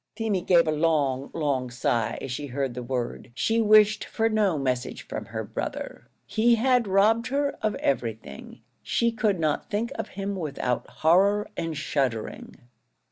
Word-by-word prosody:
Feemy 215 -5 -1
gave 170 -2 +4
a - - +2
long, 150 -4 +1
long 140 -5 -1
sigh 120 -2 -1
as 135 - -5
she 145 +3 -4
heard 135 -1 -2
the 125 - -5
word. 120 -1 -4
She 225 - +1
wished 215 -1 +5
for 225 0 0
no 210 -6 +2
message 130 -3 -2
from - - -6
her - - -5
brother; - - -6 0.2
he 235 +2 +3
had 245 0 +2
robbed 210 +4 +3
her 280 +2 0
of 215 -1 0
everything; 115 - -3 0.2
she 235 0 +1
could 215 -4 0
not 155 -2 -1
think 220 +3 -1
of 225 - -4
him 200 0 -2
without 140 -8 -2
horror 195 +6 +3
and 165 -2 -3
shuddering. 130 -7 -2
165 Hz, 160 wpm, -26 LUFS, 135-215 Hz, 0.2 s, wished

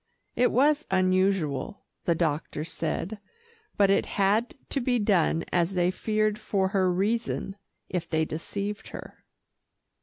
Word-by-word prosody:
It 245 - +3
was 295 +4 +3
unusual, 185 -4 +1 0.2
the 170 - +2
doctor 155 -2 -1
said, 195 +5 -3 0.6
but 200 -1 +5
it 195 - +2
had 210 +4 +2
to 275 - 0
be 245 0 +1
done, 190 -6 +2
as 175 +2 +1
they 180 0 +2
feared 215 +2 0
for 195 -3 0
her 190 -2 +2
reason, 200 +1 -1 0.3
if 175 -2 -3
they 160 -1 +1
deceived 200 +6 -4
her. - - -10
195 Hz, 130 wpm, -27 LUFS, 175-215 Hz, 0.6 s, but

